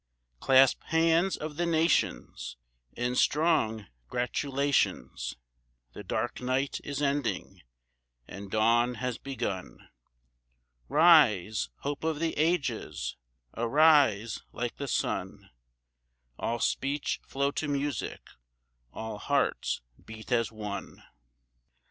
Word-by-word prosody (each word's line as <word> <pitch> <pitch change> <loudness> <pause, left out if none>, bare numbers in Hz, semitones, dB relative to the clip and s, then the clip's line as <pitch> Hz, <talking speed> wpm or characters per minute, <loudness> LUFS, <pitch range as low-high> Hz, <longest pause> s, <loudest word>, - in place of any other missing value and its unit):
Clasp 135 - +5
hands 165 +3 +2
of 150 -1 -6
the 175 - +1
nations 160 - 0 0.4
In 125 +1 -1
strong 140 -9 +2 0.2
gratulations: 140 +3 -1 0.6
The 105 - -8
dark 120 +6 -3
night 130 +2 -1
is 145 0 -3
ending 140 -3 -1 0.7
and 100 +1 -9
dawn 115 +3 +3
has 125 0 -3
begun; 100 - -5 1.0
Rise, 120 - +5
hope 145 +1 -4
of 160 -1 0
the 165 0 -1
ages, 140 - -1 0.4
arise 120 -4 +4
like 120 -1 -4
the 140 - -4
sun, - - -2 0.9
All 120 - -1
speech 140 +4 -1
flow 140 +1 0
to 150 - -3
music, 145 -3 -2 0.7
all 110 -1 -6
hearts 140 +5 0 0.2
beat 110 +2 -11
as 115 -2 +2
one! 105 -2 -7
135 Hz, 100 wpm, -29 LUFS, 110-150 Hz, 1.0 s, Clasp